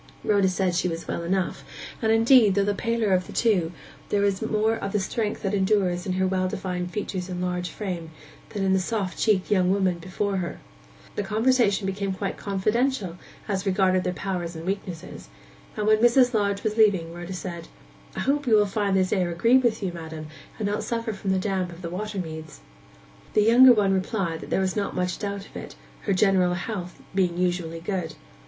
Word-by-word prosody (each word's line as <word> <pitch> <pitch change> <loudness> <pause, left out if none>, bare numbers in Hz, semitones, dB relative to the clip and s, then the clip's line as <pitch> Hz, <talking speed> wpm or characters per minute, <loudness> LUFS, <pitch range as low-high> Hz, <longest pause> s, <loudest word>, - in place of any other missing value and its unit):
Rhoda 200 -3 +3
said 185 -1 0
she 180 +1 +1
was 165 -1 -4
well - - -2
enough; 185 +2 -1 0.4
and, 220 -1 +2
indeed, 225 -2 +6
though 200 - +3
the 205 - +1
paler 230 -1 0
of 180 0 +1
the - - -9
two, 190 -8 +2 0.4
there 205 - +1
was 200 -1 +1
more 220 0 +1
of 200 -3 -5
the 210 - +2
strength 210 +2 -2
that 195 0 -1
endures 190 -2 +1
in 185 - 0
her 190 +1 +1
well 185 0 +1
defined 180 -1 -3
features 190 -2 -4
and 180 -1 -4
large 180 0 -2
frame, 180 -6 -5 0.4
than 200 - -3
in 190 0 +3
the 190 - +3
soft 195 -1 -2
cheeked 210 -3 +2
young 185 -3 +3
woman 190 -3 +1
before 190 +3 -2
her. 175 -2 -3 0.6
The - - 0
conversation 220 0 +2
became 195 0 -2
quite 195 0 -3
confidential 205 -1 -1 0.3
as 195 -1 -2
regarded 185 -1 +2
their 180 - 0
powers 180 -2 -4
and 160 +1 -7
weaknesses; 185 - -5 0.5
and 210 - -1
when 215 0 +4
Mrs. 245 +2 +5
Lodge 200 -2 0
was 215 0 -1
leaving, 190 -7 +3
Rhoda 175 +2 -7
said, 170 -2 -6 0.5
'I - - -2
hope 285 0 0
you 225 - +5
will 210 -1 +5
find 200 -1 0
this 185 -1 +1
air 185 -4 +1
agree 230 +9 +4
with 230 -4 0
you, 180 -2 -2
ma'am, 160 -2 -7 0.3
and 210 - -1
not 205 +1 -1
suffer 230 -1 -2
from 195 -1 -5
the 190 - +2
damp 185 -2 -1
of 170 +2 -12
the 170 - -4
water 210 +3 -4
meads.' 160 -3 -6 0.7
The 210 - +5
younger 245 +4 +8
one 200 -3 +2
replied 190 -4 -1
that - - -9
there - - +1
was 190 -1 -1
not 205 -2 -2
much 180 -1 -1
doubt 200 -1 -4
of - - -18
it, - - -8 0.3
her 200 - +2
general 185 -2 +3
health 180 -1 -5
being 180 -3 +1
usually 175 -2 -1
good. 170 -2 -3
195 Hz, 205 wpm, -25 LUFS, 180-210 Hz, 0.7 s, younger